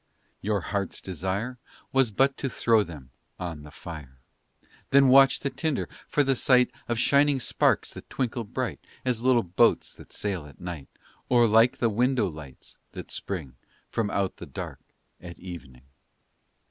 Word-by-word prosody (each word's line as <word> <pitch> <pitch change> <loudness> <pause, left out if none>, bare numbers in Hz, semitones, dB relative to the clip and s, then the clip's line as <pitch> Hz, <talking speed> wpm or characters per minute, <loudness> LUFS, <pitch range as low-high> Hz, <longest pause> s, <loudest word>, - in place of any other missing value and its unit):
Your 105 -1 0
hearts 100 +1 -3
desire 95 - -3 0.3
Was 135 -3 +4
but 135 +6 +2
to 135 - -2
throw 115 -2 +3
them 75 -9 -8 0.3
on 85 -4 -5
the 75 - -11
fire, 75 -4 -10 0.7
Then 140 -1 +6
watch 135 +1 +6
the 140 - -2
tinder, 160 -5 -1 0.2
for 145 - +2
the 135 -1 +2
sight 125 0 +4 0.2
Of 120 - 0
shining 140 +3 +4
sparks - - +1
that - - -11
twinkle 120 -2 -2
bright 100 - -4 0.3
As 125 -3 0
little 125 -1 +4
boats 90 0 +2
that - - -15
sail 95 -7 -3
at 70 - -16
night, 85 -6 -6 0.4
Or 120 -1 +5
like 115 +3 +4
the 120 - +2
window 125 +2 +2
lights 75 -6 -11
that - - -8
spring 75 -10 -5 0.3
From 115 -3 0
out 100 -2 -1
the - - -9
dark - - -7 0.4
at 85 -1 -9
evening. 75 -9 -10
105 Hz, 160 wpm, -27 LUFS, 85-125 Hz, 0.7 s, Then